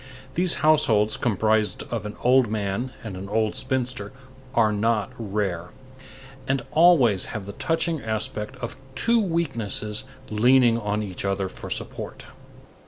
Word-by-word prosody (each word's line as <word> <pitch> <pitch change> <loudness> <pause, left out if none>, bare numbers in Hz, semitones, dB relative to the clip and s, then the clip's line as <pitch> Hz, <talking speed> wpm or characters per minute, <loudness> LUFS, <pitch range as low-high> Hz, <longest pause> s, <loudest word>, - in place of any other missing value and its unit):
These 175 +2 +2
households 110 -9 +4
comprised 110 -1 +1
of 110 -3 -2
an 105 - -7
old 125 0 +5
man 105 +4 -2
and 105 -4 -6
an 95 +2 -7
old 110 0 +1
spinster 130 0 -2 0.4
are 110 -2 +4
not 105 -1 +1
rare, 100 -5 -2 0.8
and 135 0 0
always 150 - +5
have 105 -3 -6
the 100 - -7
touching 165 - -1
aspect 110 +1 -3
of 120 - -4 0.2
two 230 - +3
weaknesses 130 - -1 0.3
leaning 120 +1 +5
on 105 -1 -1
each 95 -3 -5
other 100 -1 0
for - - -9
support. - - -4
110 Hz, 135 wpm, -25 LUFS, 105-130 Hz, 0.8 s, old